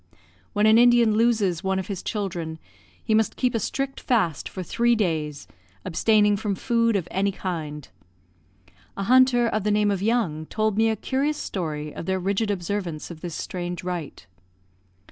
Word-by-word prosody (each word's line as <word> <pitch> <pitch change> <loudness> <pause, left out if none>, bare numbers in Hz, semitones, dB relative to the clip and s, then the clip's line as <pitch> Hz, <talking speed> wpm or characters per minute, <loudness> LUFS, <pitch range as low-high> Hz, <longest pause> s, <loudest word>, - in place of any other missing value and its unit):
When 210 +1 +2
an 220 +1 +6
Indian 240 -2 +5
loses 215 -6 +2
one 190 0 0
of 190 - -2
his 195 -3 -5
children, 175 -6 -4 0.5
he 220 - 0
must 220 0 +2
keep 250 -1 0
a 230 - +1
strict 270 +5 -3
fast 195 - 0
for 185 - -6
three 235 +6 +2
days, 155 -8 -2 0.4
abstaining 210 +3 +3
from 205 -1 -2
food 230 0 +1
of 180 -4 -1
any 195 +2 +1
kind. 155 -7 -5 1.1
A 195 - -2
hunter, 250 +1 +5
of 215 -3 -1
the 210 - +1
name 210 0 +2
of 195 -2 -2
Young, 195 -9 0
told 215 -1 0
me 225 +1 +3
a 220 - +1
curious 275 +7 -1
story 150 -5 -4
of - - -7
their 190 0 +1
rigid 200 +4 0
observance 180 -4 -3
of 160 -2 -10
this 170 -3 -5
strange 175 -1 -5
rite. 175 -5 -5
200 Hz, 170 wpm, -24 LUFS, 175-225 Hz, 1.1 s, an